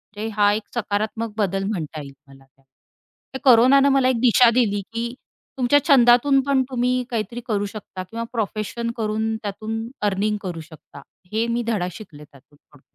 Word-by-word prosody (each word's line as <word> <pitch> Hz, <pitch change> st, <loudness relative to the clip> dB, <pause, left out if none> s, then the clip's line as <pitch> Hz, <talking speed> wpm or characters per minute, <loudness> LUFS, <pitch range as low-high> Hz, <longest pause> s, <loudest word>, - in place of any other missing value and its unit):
म्हणजे 215 Hz, +2 st, -4 dB
हा 205 Hz, -1 st, +4 dB
एक 215 Hz, +1 st, -2 dB
सकारात्मक 220 Hz, 0 st, -2 dB
बदल 195 Hz, -2 st, 0 dB
म्हणता 165 Hz, -7 st, -4 dB
येईल 140 Hz, -1 st, -10 dB
मला 135 Hz, 0 st, -17 dB
त्या 135 Hz, +1 st, -35 dB, 0.7 s
त्या 265 Hz, -, -5 dB
कोरोनाने 260 Hz, +4 st, +6 dB
मला 270 Hz, -2 st, +3 dB
एक 250 Hz, -3 st, 0 dB
दिशा 245 Hz, 0 st, +6 dB
दिली, 220 Hz, -4 st, +1 dB
की 235 Hz, +1 st, -3 dB, 0.4 s
तुमच्या 260 Hz, +3 st, +4 dB
छंदातून 270 Hz, 0 st, +5 dB
पण 275 Hz, -2 st, +3 dB
तुम्ही 250 Hz, 0 st, 0 dB
काहीतरी 235 Hz, +1 st, -4 dB
करू 205 Hz, -3 st, 0 dB
शकता 200 Hz, -2 st, -8 dB
किंवा 230 Hz, +2 st, -5 dB
प्रोफेशन 225 Hz, +1 st, -3 dB
करून 220 Hz, 0 st, -1 dB
त्यातून 215 Hz, +2 st, -4 dB, 0.3 s
अर्निंग 210 Hz, +2 st, -1 dB
करू 175 Hz, -4 st, -5 dB
शकता. 145 Hz, -3 st, -14 dB, 0.3 s
हे 225 Hz, +2 st, 0 dB
मी 235 Hz, +1 st, -1 dB
धडा 205 Hz, -6 st, 0 dB
शिकले 155 Hz, -9 st, -12 dB
त्यातून 145 Hz, +1 st, -21 dB
थोडं. 145 Hz, -2 st, -24 dB
220 Hz, 165 wpm, -22 LUFS, 195-240 Hz, 0.7 s, कोरोनाने